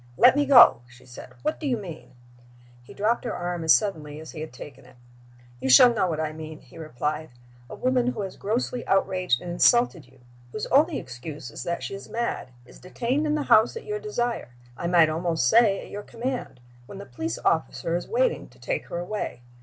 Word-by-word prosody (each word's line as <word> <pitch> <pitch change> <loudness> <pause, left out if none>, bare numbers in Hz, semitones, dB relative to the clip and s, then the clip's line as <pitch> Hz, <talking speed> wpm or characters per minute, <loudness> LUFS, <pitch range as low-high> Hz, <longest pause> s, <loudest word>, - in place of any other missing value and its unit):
"Let 250 +2 +7
me 290 -1 +1
go!" 240 - +8
she 125 0 -18
said. 125 - -12
"What 305 +1 -1
do 300 - -4
you 250 -3 +1
mean?" 175 - -10 0.7
He 120 - -16
dropped 220 +4 0
her - - -3
arm 175 -1 -3
as 160 - +4
suddenly 155 -8 +1
as 160 - -10
he 155 - -8
had 155 - -6
taken 135 +2 -11
it. 125 - -19 0.6
"You 130 - -2
shall 240 - +8
know 200 -5 +1
what 160 -3 -2
I 155 -1 -2
mean," 155 0 -9
he 165 - -15
replied. 155 +1 -4 0.4
"A - - -7
woman 255 -1 +1
who 250 -4 -2
has 195 -2 -6
grossly 240 +3 -2
outraged 185 -8 +1
and 175 - -5
insulted 175 - +3
you 130 0 -23 0.3
whose 215 - -4
only 300 +3 +4
excuse 130 +2 -8
is - - -8
that 170 0 -3
she - - -5
is 195 - -9
mad 235 -8 -3 0.2
is - - -16
detained 250 +11 -2
in 300 - +1
the 300 - -1
house 230 - +4
at 460 - -9
your 425 0 -3
desire, 240 - -3 0.3
I 170 - -4
might 170 -2 +5
almost 165 -4 0
say 205 - +4
at - - -12
your 205 - -5
command, 240 - -5 0.3
when 200 - -10
the 200 - -8
police 160 +7 -5
officer 165 +1 -1
is 175 - -3
waiting - - 0
to - - -22
take - - -3
her - - -5
away. 175 - -5
185 Hz, 215 wpm, -25 LUFS, 155-240 Hz, 0.7 s, go